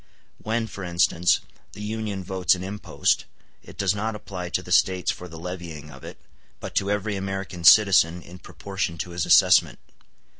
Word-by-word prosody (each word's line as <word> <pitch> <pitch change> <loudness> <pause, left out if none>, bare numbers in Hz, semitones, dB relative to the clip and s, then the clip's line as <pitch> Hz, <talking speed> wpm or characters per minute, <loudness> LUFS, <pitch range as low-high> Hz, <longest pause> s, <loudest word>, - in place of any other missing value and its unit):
When, 110 +1 -2
for 100 -2 -8
instance, 90 0 +2 0.3
the 105 - -10
Union 105 -2 -4
votes 95 0 +1
an 90 - -7
impost, 100 +2 -1 0.4
it - - -15
does 100 0 +1
not 110 +2 -3
apply 90 -4 -7
to 90 - -2
the 90 - -11
States 90 +1 +2
for 90 - -9
the 80 -1 -11
levying 85 -4 -8
of - - -14
it, - - -10 0.4
but - - -8
to 100 - +1
every 105 0 -1
American 95 -2 -5
citizen 90 -1 +6
in 90 +1 -13
proportion 95 -4 -5
to 85 - -5
his 85 -2 -3
assessment. - - +5
95 Hz, 175 wpm, -24 LUFS, 90-100 Hz, 0.4 s, citizen